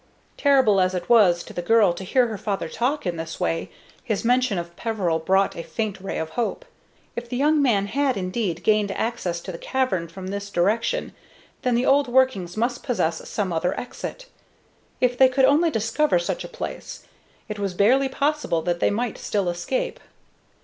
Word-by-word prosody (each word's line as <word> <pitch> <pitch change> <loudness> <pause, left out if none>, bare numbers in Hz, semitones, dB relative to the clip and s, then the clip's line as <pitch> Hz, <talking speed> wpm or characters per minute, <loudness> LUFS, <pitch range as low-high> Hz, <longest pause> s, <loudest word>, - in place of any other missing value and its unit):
Terrible 265 -9 +4
as 185 0 +1
it 175 -1 -4
was 190 -8 +5
to - - -11
the 175 - -3
girl 210 -1 +4
to 175 - -7
hear 250 +7 +3
her 220 -3 -4
father 200 -1 -2
talk 275 +4 -1
in 175 -2 -2
this 165 0 -6
way, 80 0 -1 0.3
his 215 0 -2
mention 250 -3 +2
of 170 0 -5
Peveril 195 -8 -1
brought 190 +4 +2
a - - -4
faint 210 +1 -4
ray 195 - -4
of 160 0 -3
hope. 240 - -2 0.5
If 235 0 -6
the 245 - -3
young 300 +2 +3
man 215 -8 +2
had 270 +4 0
indeed 185 0 -2
gained 210 -1 +3
access 210 -8 -2
to 185 - -6
the 170 - -8
cavern 255 -11 -1
from 185 +3 -8
this 200 +1 -4
direction, 215 - 0 0.5
then 250 -2 +1
the 245 +2 +1
old 280 0 +4
workings 240 -8 +1
must 240 +2 0
possess 170 - -1
some 195 -4 -2
other 165 +2 -1
exit. - - -7 0.7
If 250 -1 +1
they 260 -1 +7
could 260 +1 +3
only 300 +5 +4
discover 230 - +1
such 175 - -2
a - - -6
place, - - -7 0.4
it 210 -1 -5
was 195 -3 -2
barely 260 +8 +3
possible 280 - 0
that 175 -1 -1
they - - +3
might 230 +2 -2
still 200 -4 -1
escape. - - -2
215 Hz, 190 wpm, -24 LUFS, 180-255 Hz, 0.7 s, they